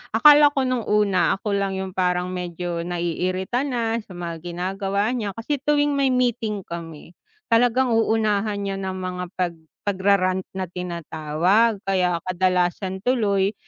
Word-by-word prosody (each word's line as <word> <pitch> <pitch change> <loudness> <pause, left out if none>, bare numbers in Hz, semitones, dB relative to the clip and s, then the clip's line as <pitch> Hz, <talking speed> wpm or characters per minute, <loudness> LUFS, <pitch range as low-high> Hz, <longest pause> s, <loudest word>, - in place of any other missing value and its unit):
Akala 295 +5 +8
ko 270 - +2
no'ng 255 -3 -1
una 205 -3 +3
ako 205 +2 -4
lang 195 -1 -1
'yung 190 0 -4
parang 180 -1 0
medyo 175 -1 -4
naiirita 185 - -1
na, 230 -3 -1
sa 205 -3 -12
mga 170 -2 -5
ginagawa 195 +4 -1
niya, 215 -6 -3
kasi 255 +6 -2
tuwing 290 +1 +2
may 275 -1 +3
meeting 235 -5 0
kami, 165 -2 -8 0.4
talagang 245 +2 +3
uunahan 215 -2 +1
niya 195 -1 -3
ng 190 -1 -3
mga 185 -1 -4
pag 175 -2 -1 0.3
pagra-rant 190 -1 +2 0.2
na 190 - -1
tinatawag, 175 +4 0
kaya 180 -3 +1
kadalasan 185 +1 0
tuloy, 205 -5 +2
195 Hz, 140 wpm, -23 LUFS, 180-225 Hz, 0.4 s, Akala